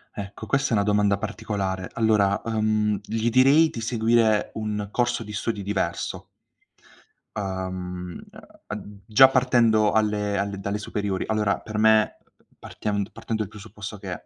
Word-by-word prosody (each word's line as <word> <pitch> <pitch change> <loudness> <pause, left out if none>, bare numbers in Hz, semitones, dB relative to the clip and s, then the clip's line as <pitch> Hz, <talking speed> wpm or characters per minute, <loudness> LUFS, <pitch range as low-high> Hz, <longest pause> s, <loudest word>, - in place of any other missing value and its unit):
Ecco, 100 0 -7
questa 140 -3 0
è - - +2
una 100 -2 +3
domanda 105 -1 +2
particolare. 95 -3 -3
Allora, 105 -3 +2
uhm, 110 -2 +1
gli 110 +2 -1
direi 140 +6 +5
di 115 - -6
seguire 110 -2 +2
un 105 -2 -3
corso 120 -1 0
di 105 0 -9
studi 105 0 -3
diverso. 100 +1 -3 1.1
Uhm, 95 -2 -5 0.5
uhm, - - -5
uhm, 100 -1 -13
già 130 +5 +8
partendo 120 -5 +3
alle 105 -2 +1
alle 100 0 -2
dalle 100 +1 -2
superiori, 100 -2 -3
allora 105 -2 +1
per 110 -1 -5
me, 110 0 +4 0.4
partiam 100 -1 -3
partendo 110 -1 -4
il 100 - -9
presupposto 105 0 -9
che 95 -2 -7
105 Hz, 145 wpm, -24 LUFS, 100-110 Hz, 1.1 s, già